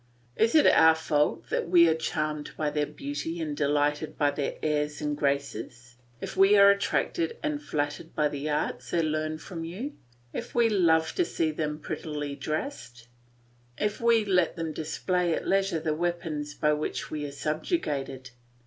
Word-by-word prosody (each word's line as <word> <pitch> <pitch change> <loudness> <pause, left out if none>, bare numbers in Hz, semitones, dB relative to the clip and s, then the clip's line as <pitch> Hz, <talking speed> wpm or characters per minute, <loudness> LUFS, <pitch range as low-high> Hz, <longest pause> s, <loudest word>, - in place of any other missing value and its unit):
Is 225 +6 +2
it 310 - +6
our 160 0 +7
fault 150 -2 0
that - - -1
we 170 -1 +7
are 160 - +4
charmed 155 -2 -3
by 150 -1 0
their 150 0 0
beauty 275 - -5
and 155 -3 -3
delighted 145 +1 0
by 145 -1 +3
their 145 0 -3
airs 150 -1 0
and 150 -1 -1
graces, 125 -4 -3 0.2
if - - -6
we 195 +2 +6
are 200 0 +8
attracted 330 - 0
and 300 -1 -1
flattered 150 - -3
by 150 -1 +3
the 145 +1 -4
arts 125 -5 -2
they 165 +5 +1
learn 155 0 -1
from 165 0 -7
you, 205 - -5 0.4
if 235 - -6
we 235 -1 +4
love 165 -6 +3
to 360 - +2
see 165 - -1
them 150 -1 -3
prettily 150 -2 -5
dressed, 130 - -5 0.7
if 210 +1 -1
we 230 -2 +4
let 180 -4 +2
them 165 -2 -3
display 175 +2 -1
at - - -5
leisure 195 -3 +2
the 155 0 -1
weapons 155 -3 -3
by 150 0 +2
which 150 +1 -3
we 150 -1 -3
are - - -7
subjugated? 140 - -3
155 Hz, 170 wpm, -28 LUFS, 150-180 Hz, 0.7 s, are